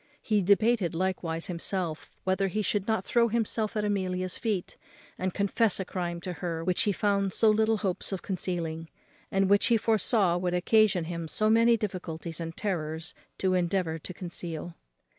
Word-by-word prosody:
He 210 Hz, -2 st, +1 dB
debated 200 Hz, -1 st, +3 dB
likewise 170 Hz, -2 st, -1 dB
with -, -, -8 dB
himself 175 Hz, -2 st, -2 dB
whether 190 Hz, +1 st, +1 dB
he 215 Hz, +3 st, -1 dB
should 205 Hz, 0 st, 0 dB
not 220 Hz, -4 st, 0 dB
throw 235 Hz, -1 st, +3 dB
himself 220 Hz, -1 st, -1 dB
at 210 Hz, -, 0 dB
Amelia's 185 Hz, -3 st, -1 dB
feet, 210 Hz, -6 st, -2 dB, 0.4 s
and 185 Hz, 0 st, -2 dB
confess 200 Hz, +2 st, +1 dB
a 190 Hz, -, -2 dB
crime 175 Hz, -2 st, -3 dB
to 180 Hz, +1 st, -4 dB
her 165 Hz, -2 st, -2 dB
which 180 Hz, +1 st, +1 dB
he 205 Hz, -, +3 dB
found 200 Hz, -1 st, +1 dB
so 220 Hz, -1 st, +5 dB
little 220 Hz, +1 st, +2 dB
hopes 190 Hz, -1 st, -3 dB
of 190 Hz, -3 st, -4 dB
concealing, 165 Hz, -4 st, -3 dB, 0.4 s
and 195 Hz, 0 st, +2 dB
which 200 Hz, +1 st, +4 dB
he 235 Hz, -, +4 dB
foresaw 215 Hz, -4 st, +2 dB
would 180 Hz, 0 st, -1 dB
occasion 195 Hz, 0 st, +3 dB
him 170 Hz, 0 st, -4 dB
so 215 Hz, +6 st, +1 dB
many 230 Hz, +1 st, +5 dB
difficulties 170 Hz, -5 st, -5 dB
and 165 Hz, 0 st, -5 dB
terrors 165 Hz, -4 st, -3 dB, 0.2 s
to 190 Hz, -1 st, +1 dB
endeavour 175 Hz, -2 st, 0 dB
to 170 Hz, -, -7 dB
conceal. 175 Hz, -2 st, -5 dB
185 Hz, 175 wpm, -28 LUFS, 175-210 Hz, 0.4 s, so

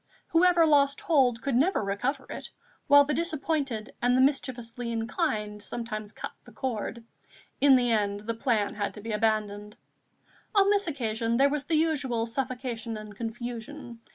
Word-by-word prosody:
Whoever 340 Hz, 0 st, +5 dB
lost 285 Hz, +1 st, +3 dB
hold 265 Hz, -, +2 dB
could 275 Hz, -, -1 dB
never 285 Hz, -, +2 dB
recover 250 Hz, +8 st, -2 dB
it, -, -, -7 dB, 0.4 s
while 285 Hz, -1 st, +7 dB
the 295 Hz, -, -1 dB
disappointed 295 Hz, -9 st, -2 dB
and 245 Hz, +1 st, +3 dB
the -, -, +4 dB
mischievously 245 Hz, -3 st, 0 dB
inclined 225 Hz, -, -2 dB
sometimes 215 Hz, -1 st, -5 dB
cut -, -, -7 dB
the -, -, -15 dB
cord. 235 Hz, -2 st, -4 dB, 0.6 s
In 280 Hz, -1 st, +7 dB
the 245 Hz, -2 st, +2 dB
end 205 Hz, -2 st, 0 dB
the 230 Hz, +2 st, -3 dB
plan 225 Hz, -3 st, 0 dB
had 205 Hz, -1 st, -3 dB
to 210 Hz, -, -9 dB
be 225 Hz, +2 st, -5 dB
abandoned. 210 Hz, -1 st, -1 dB, 0.8 s
On 400 Hz, 0 st, +5 dB
this 405 Hz, -2 st, +2 dB
occasion 230 Hz, -5 st, -1 dB
there 275 Hz, +2 st, +5 dB
was 285 Hz, -1 st, -2 dB
the 330 Hz, -, 0 dB
usual 285 Hz, -8 st, +1 dB
suffocation 245 Hz, -2 st, -3 dB
and 215 Hz, -1 st, -9 dB
confusion. 240 Hz, +3 st, -6 dB
245 Hz, 155 wpm, -28 LUFS, 220-285 Hz, 0.8 s, while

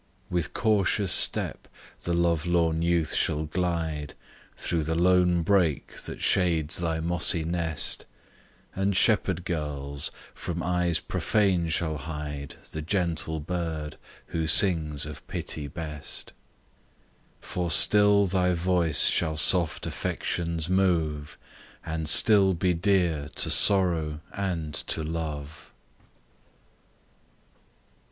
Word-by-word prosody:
With 85 Hz, -4 st, -2 dB
cautious 100 Hz, -3 st, +1 dB
step, -, -, 0 dB, 0.4 s
the 85 Hz, -, 0 dB
love 85 Hz, -1 st, +1 dB
lorn 85 Hz, -2 st, +1 dB
youth 85 Hz, -1 st, +1 dB
shall 75 Hz, +1 st, 0 dB
glide 80 Hz, -3 st, -3 dB, 0.4 s
Thro' 85 Hz, -, -1 dB
the 80 Hz, +2 st, -2 dB
lone 90 Hz, 0 st, +3 dB
brake 90 Hz, -5 st, +1 dB
that -, -, -7 dB
shades 85 Hz, -5 st, +1 dB
thy 80 Hz, -2 st, -1 dB
mossy 85 Hz, +1 st, +1 dB
nest; 80 Hz, -3 st, -1 dB, 0.7 s
And 95 Hz, 0 st, 0 dB
shepherd 95 Hz, -5 st, +2 dB
girls, 75 Hz, -3 st, -3 dB, 0.2 s
from 85 Hz, -2 st, -5 dB
eyes 90 Hz, -2 st, 0 dB
profane 95 Hz, -6 st, 0 dB
shall 80 Hz, -1 st, -1 dB
hide 75 Hz, -1 st, -6 dB, 0.2 s
The 80 Hz, -, -5 dB
gentle 85 Hz, -2 st, -1 dB
bird, 80 Hz, -2 st, -4 dB, 0.3 s
who 80 Hz, -2 st, -2 dB
sings 80 Hz, -4 st, +3 dB
of 75 Hz, -1 st, -9 dB
pity 75 Hz, -2 st, -4 dB
best: 75 Hz, -1 st, -7 dB, 1.1 s
For 90 Hz, -1 st, -4 dB
still 105 Hz, +3 st, +5 dB
thy 90 Hz, -1 st, +1 dB
voice 85 Hz, -2 st, +2 dB
shall 80 Hz, -2 st, +1 dB
soft 85 Hz, 0 st, +3 dB
affections 85 Hz, -2 st, -3 dB
move, 80 Hz, -6 st, 0 dB, 0.5 s
And 80 Hz, -1 st, -3 dB
still 100 Hz, -2 st, +6 dB
be 90 Hz, +2 st, +1 dB
dear 85 Hz, -5 st, +1 dB
to -, -, +1 dB
sorrow, 85 Hz, -6 st, +3 dB
and 85 Hz, -6 st, -3 dB
to 80 Hz, +2 st, -1 dB
love! 75 Hz, -2 st, -6 dB
85 Hz, 110 wpm, -26 LUFS, 80-90 Hz, 1.1 s, still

